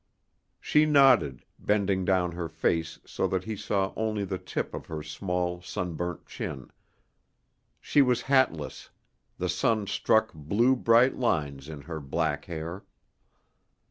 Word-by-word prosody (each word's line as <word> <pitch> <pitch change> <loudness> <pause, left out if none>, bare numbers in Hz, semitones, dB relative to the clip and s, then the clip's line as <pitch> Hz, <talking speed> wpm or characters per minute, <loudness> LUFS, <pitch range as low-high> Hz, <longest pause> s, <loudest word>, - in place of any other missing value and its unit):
She 150 0 +3
nodded, 135 - +4
bending 100 -3 +1
down 90 -2 +2
her 85 -1 -5
face 80 0 -1
so - - -1
that 95 -1 -1
he 110 +2 -4
saw 95 -1 -1
only 110 -2 -1
the 95 -1 -4
tip 90 - -4
of - - -7
her 80 -1 -5
small, 90 +2 -3
sunburnt 90 -2 -4
chin. 65 - -6 1.1
She 145 - +3
was 125 -2 +2
hatless; 130 - +1 0.5
the 90 - -2
sun 105 +4 +1
struck 110 +2 +2
blue, 100 - +2
bright 120 +1 +4
lines 75 - -1
in 75 -2 -8
her 80 +2 -6
black 70 -2 -2
hair. 85 +2 -6
90 Hz, 135 wpm, -28 LUFS, 80-110 Hz, 1.1 s, nodded